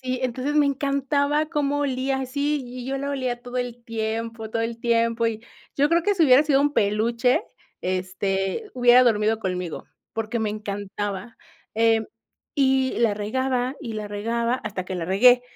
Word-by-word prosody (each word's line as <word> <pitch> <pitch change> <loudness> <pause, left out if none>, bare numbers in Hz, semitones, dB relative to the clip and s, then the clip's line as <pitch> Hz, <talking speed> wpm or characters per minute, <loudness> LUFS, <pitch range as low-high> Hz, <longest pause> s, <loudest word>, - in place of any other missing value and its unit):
Sí, 255 -1 -3
entonces 255 +3 -2
me 295 -1 +4
encantaba 280 +2 +1
cómo 290 -3 0
olía 265 -1 0
así, 285 +2 -1
y 245 0 -8
yo 270 - -2
la 280 +1 -3
olía 255 -3 -2
todo 245 +1 -7
el 245 -1 -3
tiempo 225 0 -3
todo 225 +1 -1
el 230 0 -3
tiempo, 230 0 +1
y 225 -1 -3 0.3
yo 285 +1 +3
creo 335 +1 +3
que 410 - +3
si 340 -4 +4
hubiera 265 +1 +6
sido 280 -3 +3
un 290 +1 +2
peluche, 235 +3 +2 0.4
este, 190 - -2
hubiera 245 0 +6
dormido 220 -2 +2
conmigo, 180 -4 -4 0.3
porque 225 +1 -2
me 220 -2 -1
encantaba. 205 0 -5 0.4
Em, 225 0 +3 0.5
y 265 -2 +2
la 230 -2 +3
regaba, 250 +4 -1
y 230 - -6
la 215 -1 -4
regaba, 230 +4 -1
hasta 195 -4 -4
que 185 - -5
la 175 - -3
regué. 245 +8 +5
240 Hz, 170 wpm, -24 LUFS, 215-265 Hz, 0.5 s, hubiera